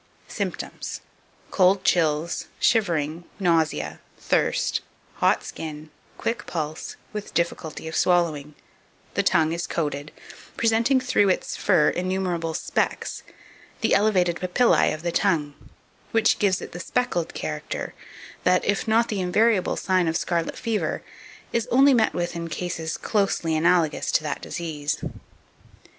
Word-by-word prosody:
2561. - - -4
Symptoms. - - -5 0.5
Cold 190 0 +4
chills, 160 -2 +1
shivering, 170 -7 +1 0.2
nausea, 165 -4 +1 0.2
thirst, - - +1 0.4
hot - - +3
skin, 155 -1 -7 0.3
quick 230 -2 -3
pulse, 155 -2 -4 0.2
with 210 -1 -6
difficulty 165 -2 -2
of 160 - -5
swallowing; 155 -5 +1 0.6
the - - +2
tongue 160 0 +3
is 170 +1 -3
coated, 145 -2 -3 0.5
presenting 230 +3 +3
through 250 -6 +2
its 185 - 0
fur 170 -7 +3
innumerable 180 -3 -1
specks, - - -1 0.6
the - - +2
elevated 185 -5 +3
papillae 185 +7 +3
of 155 +1 -5
the 170 - 0
tongue, 160 -7 +1 0.6
which 225 -1 +3
gives 195 -3 +2
it - - -8
the 175 - -7
speckled 175 -5 -1
character, - - -4 0.5
that, 180 0 +3
if 205 +2 0
not 230 +2 +3
the 205 -3 -2
invariable 205 +2 +2
sign 185 -3 +1
of 160 +1 +1
scarlet 170 -2 -1
fever, 230 -3 -2 0.5
is 235 0 0
only 270 +3 +6
met 225 -3 +3
with 175 0 -2
in 170 0 -4
cases 165 -1 -3
closely 195 -6 0
analogous 165 -1 +2
to - - +2
that 150 -2 -3
disease. 150 -4 -3
175 Hz, 130 wpm, -24 LUFS, 160-205 Hz, 0.6 s, only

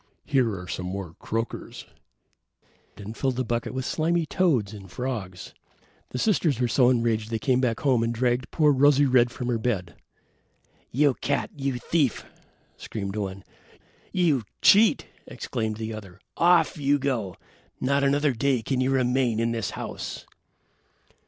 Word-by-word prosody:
Here 120 -8 +1
are 90 - -9
some 90 +1 -4
more 95 -3 -5
croakers," 115 +1 -4 1.1
and 100 - -9
he - - -5
filled 130 +2 -1
the 130 - -1
bucket 120 0 -2
with 130 0 -4
slimy 165 +1 0
toads 140 - +1
and 95 -3 -10
frogs. 100 -6 -5 0.6
The - - -5
sisters 160 - +1
were 125 - +2
so 125 +1 +4
enraged 115 -3 +1
that 115 -1 -2
they 135 - +1
ran 125 - +2
back 120 -3 0
home 130 -5 +3
and 115 0 0
dragged 125 +1 0
poor 150 -3 +3
Rosy 145 +1 +5
red 125 -2 +4
from 125 0 -6
her 120 -2 0
bed. 100 -7 -2 1.0
"You 140 +2 +3
cat, 140 +2 -1
you 135 -3 -2
thief," 135 0 0 0.5
screamed 100 -2 -5
one. 95 -2 -4 0.7
"You 165 -8 +2 0.2
cheat," 215 +2 +6 0.2
exclaimed 110 -2 -4
the 110 0 -4
other. 100 -4 -10 0.2
"Off 170 -3 +4
you 145 0 +3
go. 125 -9 -2 0.4
Not 140 +2 +1
another 145 +1 +2
day 125 -1 0
can 130 +2 -1
you 130 - +1
remain 125 -3 +1
in 115 0 +1
this 115 -4 -2
house." - - -6
125 Hz, 160 wpm, -25 LUFS, 110-140 Hz, 1.1 s, cheat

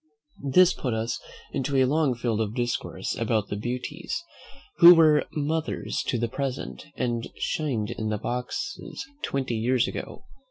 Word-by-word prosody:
This 185 +2 +7
put 125 -4 -2
us 115 +2 -2 0.3
into 140 0 -1
a 130 - +5
long 145 -1 +2
field 115 -2 -1
of 110 0 -2
discourse 120 -1 -2
about 110 -3 0
the - - -2
beauties, 125 - -4 0.5
who 175 0 +11
were 155 -3 +5
mothers 150 -8 -2
to - - +1
the 120 0 0
present, 125 - -4
and 120 -2 -1
shined 120 -8 -1
in 110 -2 -3
the 105 - 0
boxes 125 - -4 0.2
twenty 135 -3 -1
years 125 +3 +2
ago. - - -6
125 Hz, 150 wpm, -26 LUFS, 115-145 Hz, 0.5 s, who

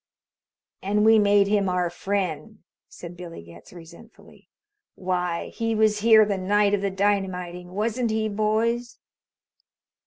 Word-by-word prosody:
"And 210 +2 0
we 220 0 +6
made 205 -1 +4
him 200 -1 +1
our 180 -1 -1
friend," 195 +2 -4 0.3
said 175 0 -11
Billy 170 - -10
Getz 85 0 -16
resentfully. 170 +6 -16 0.5
"Why, 180 -2 -3
he 225 -1 -3
was 215 -1 +2
here 220 0 +6
the 200 -2 -2
night 205 +2 +1
of 205 - +1
the 200 - -1
dynamiting 185 -3 -2
wasn't 230 +4 -1
he, 220 0 -1
boys?" 220 +3 -1
200 Hz, 130 wpm, -24 LUFS, 180-215 Hz, 0.5 s, we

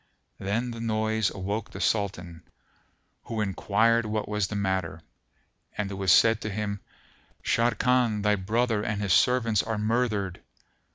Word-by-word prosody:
Then 110 +5 -2
the 115 - -7
noise 110 -1 0
awoke 100 +3 -4
the - - -9
Sultan, 90 -6 -1 0.8
who 115 - -4
enquired 110 +3 +2
what 105 -1 -2
was 105 -2 -1
the 105 - -5
matter, 95 -5 -2 0.8
and 100 -1 -2
it - - -4
was 95 -2 +1
said 115 -1 +5
to 110 - -3
him, 100 0 -3 0.6
"Sharrkan 115 -1 +2
thy 105 0 +3
brother 110 +3 0
and 105 -1 -2
his 100 -3 +1
servants 115 -4 +3
are 110 -1 -3
murthered." 105 -4 -1
105 Hz, 145 wpm, -27 LUFS, 100-115 Hz, 0.8 s, said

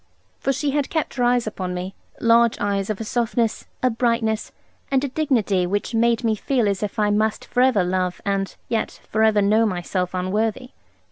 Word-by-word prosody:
For 275 - 0
she 285 +1 -1
had 285 -1 0
kept 315 -2 -2
her 250 - -1
eyes 245 0 +3
upon 185 -4 -4
me; 185 +2 -5 0.3
large 230 0 +4
eyes 200 -1 -1
of 215 - -2
a - - -3
softness, 230 0 -1 0.2
a 255 - +3
brightness, 230 -2 0 0.4
and 270 -1 +2
a - - 0
dignity 230 - +1
which 205 +5 -2
made 235 +1 +2
me 225 -1 +2
feel 235 +1 0
as 200 -2 -1
if 210 +1 -3
I 210 -1 +2
must 215 +1 0
for 245 - 0
ever 255 -7 +4
love 180 0 -1
and 195 -1 -1
yet 225 -2 -2
for 220 - +1
ever 215 -2 +4
know 215 +3 +4
myself 180 -1 -2
unworthy. 215 +7 -1
220 Hz, 195 wpm, -22 LUFS, 200-240 Hz, 0.4 s, large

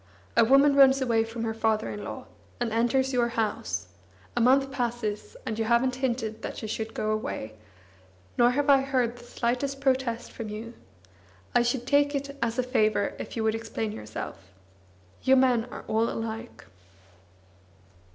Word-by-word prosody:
A - - +6
woman 275 +4 +5
runs 275 -1 +7
away 230 -4 +2
from 225 +1 -5
her 225 -1 -1
father 220 -1 0
in 205 - -6
law, - - -7 0.3
and 240 -2 -1
enters 260 +4 +2
your 240 -1 +3
house; 220 - -2 0.5
a 240 - +1
month 270 +3 +4
passes, 240 -5 -3
and 220 0 -3
you 225 - +1
haven't 245 +2 +2
hinted 235 -4 -2
that - - -5
she - - -5
should 220 +1 -4
go 215 - -1
away, 165 - -3 0.8
nor 240 0 +5
have 280 +3 0
I 275 -1 +6
heard 255 -3 0
the 240 - -13
slightest 250 +3 -2
protest 260 -4 0
from 225 -2 -6
you. 220 +3 -7 0.8
I - - +5
should 240 +1 0
cake 285 +2 +3
it 280 0 -4
as 235 +1 0
a 255 - +2
favour 215 -5 +1
if - - -6
you 225 - 0
would 220 0 +2
explain 225 -1 -3
yourself. 105 - -7 0.7
You 265 - +5
men 250 -3 +3
are 245 - -9
all 225 +1 +1
alike." 225 +1 -6
235 Hz, 170 wpm, -27 LUFS, 225-260 Hz, 0.8 s, runs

